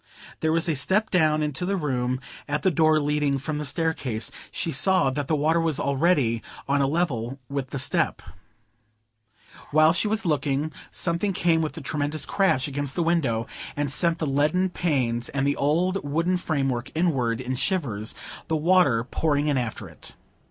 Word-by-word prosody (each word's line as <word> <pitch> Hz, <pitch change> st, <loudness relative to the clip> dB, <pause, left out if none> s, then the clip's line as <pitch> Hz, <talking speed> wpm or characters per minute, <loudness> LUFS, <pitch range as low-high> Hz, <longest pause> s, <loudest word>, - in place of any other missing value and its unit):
There 160 Hz, -, +1 dB
was 165 Hz, +2 st, +2 dB
a 160 Hz, -, +1 dB
step 190 Hz, +10 st, +1 dB
down 155 Hz, -4 st, +3 dB
into 150 Hz, +2 st, -2 dB
the 195 Hz, +2 st, 0 dB
room 130 Hz, -5 st, -1 dB, 0.3 s
at 145 Hz, 0 st, -2 dB
the 190 Hz, -, +3 dB
door 155 Hz, 0 st, +4 dB
leading 145 Hz, -1 st, +1 dB
from 150 Hz, +3 st, -3 dB
the 150 Hz, -, -4 dB
staircase; 145 Hz, -7 st, -1 dB, 0.2 s
she 165 Hz, -, -3 dB
saw 170 Hz, +1 st, +2 dB
that 145 Hz, 0 st, -3 dB
the 155 Hz, -, +2 dB
water 160 Hz, +3 st, +2 dB
was 160 Hz, -3 st, 0 dB
already 140 Hz, -5 st, +2 dB, 0.3 s
on 140 Hz, 0 st, +2 dB
a 135 Hz, -, +2 dB
level 135 Hz, -6 st, -1 dB
with 140 Hz, -2 st, -3 dB
the 140 Hz, -, -4 dB
step. 130 Hz, -2 st, 0 dB, 1.5 s
While 155 Hz, +2 st, +5 dB
she 180 Hz, -, +1 dB
was 215 Hz, 0 st, -1 dB
looking, 150 Hz, -1 st, 0 dB, 0.2 s
something 175 Hz, +3 st, 0 dB
came 165 Hz, -2 st, +2 dB
with 155 Hz, 0 st, -3 dB
a -, -, -5 dB
tremendous 150 Hz, +1 st, -1 dB
crash 190 Hz, -10 st, +2 dB
against 145 Hz, -1 st, -2 dB
the 170 Hz, -, +1 dB
window, 135 Hz, -10 st, +1 dB, 0.3 s
and 145 Hz, -2 st, -1 dB
sent 170 Hz, +3 st, +1 dB
the 160 Hz, -, -2 dB
leaded 155 Hz, +7 st, +1 dB
panes 125 Hz, -8 st, 0 dB
and 135 Hz, -1 st, -1 dB
the 140 Hz, -, +2 dB
old 175 Hz, +7 st, +1 dB
wooden 165 Hz, +6 st, 0 dB
framework 135 Hz, -7 st, -1 dB
inward 135 Hz, -9 st, +1 dB
in 130 Hz, 0 st, -3 dB
shivers, 125 Hz, -, -1 dB, 0.3 s
the 160 Hz, -, +1 dB
water 155 Hz, -8 st, +3 dB
pouring 145 Hz, +3 st, 0 dB
in 145 Hz, -, +1 dB
after 120 Hz, -3 st, -4 dB
it. -, -, -10 dB
150 Hz, 175 wpm, -25 LUFS, 135-165 Hz, 1.5 s, While